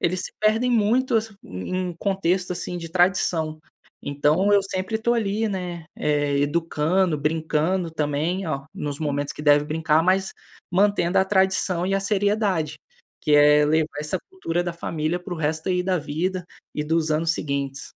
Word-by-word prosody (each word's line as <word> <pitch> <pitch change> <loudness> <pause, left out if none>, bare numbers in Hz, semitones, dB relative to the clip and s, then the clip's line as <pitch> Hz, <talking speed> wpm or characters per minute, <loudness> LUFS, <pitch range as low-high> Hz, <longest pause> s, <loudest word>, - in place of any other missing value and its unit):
eles 180 +1 0
se - - -6
perdem 220 +4 +2
muito 235 +3 +2
assi 220 -1 -2
em 175 - -4
contexto 190 -2 0
assim 175 0 -4
de 165 -1 -7
tradição. 175 -3 +1 0.4
Então 150 +8 +2
eu 200 -1 +5
sempre 195 +3 -3
tô 235 +2 +1
ali, 215 0 0
né, 180 -4 -4
eh, 145 -1 +1
educando, 165 +3 +1
brincando 160 +3 0
também, 155 +4 -1
ó, 140 -4 -3
nos 145 -7 -4
momentos 145 -1 -1
que - - -9
deve 145 -1 +5
brincar, 155 +1 +1
mas 190 +1 +2 0.4
mantendo 190 -1 +2
a 190 - +4
tradição 190 -2 +1
e 195 - 0
a 195 - +1
seriedade, 200 -6 0 0.5
que 150 - +3
é 150 0 +6
levar 155 -1 0
essa 150 0 -2
cultura 175 - -2
da 175 - -2
família 165 0 -2
para 180 0 -7
o - - -7
resto 155 +2 -1
aí 180 0 +1
da 185 0 +1
vida 170 +5 -2 0.3
e 150 - -2
dos 160 0 0
anos 160 +2 +1
seguintes. 140 -2 -3
170 Hz, 165 wpm, -23 LUFS, 150-190 Hz, 0.5 s, é